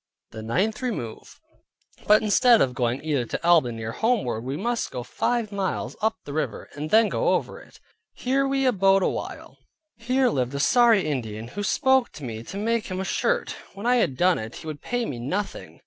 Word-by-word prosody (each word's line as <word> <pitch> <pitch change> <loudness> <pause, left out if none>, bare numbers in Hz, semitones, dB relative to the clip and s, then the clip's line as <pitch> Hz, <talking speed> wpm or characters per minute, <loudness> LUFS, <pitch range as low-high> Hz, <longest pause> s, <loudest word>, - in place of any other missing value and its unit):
THE 110 - -8
NINTH 190 - -1
REMOVE 205 - -5 0.7
But 215 +1 +6
instead 230 +2 +5
of 125 - +2
going 120 +2 -1
either 145 -6 0
to 170 - -3
Albany 125 -10 +3
or 110 - -3
homeward, 210 - 0
we 135 +3 -4
must 235 +5 -2
go 125 - -5
five 225 - -1
miles 195 -2 -3
up 220 +1 +1
the 140 - -7
river, 155 - -3
and 150 +1 -5
then 220 +3 +5
go - - +1
over - - -4
it. - - -18 0.4
Here 275 +2 0
we 270 0 0
abode 195 -5 +3
a - - +2
while. - - -7 0.4
Here 255 +2 +1
lived 130 - -1
a - - -2
sorry 230 - +4
Indian, 115 -6 -4
who 205 - -5
spoke 265 +4 +2
to 150 - -10
me 115 -3 -5
to 180 +12 -8
make 230 +2 -1
him 185 -1 -4
a 190 - -2
shirt. - - 0 0.2
When 200 +3 -8
I 250 +1 +4
had 155 - +1
done 180 +2 +3
it, 110 +1 -7
he - - -10
would 155 -2 -6
pay 245 -1 -2
me 125 - -5
nothing. 190 +12 -4
195 Hz, 205 wpm, -25 LUFS, -, 0.7 s, But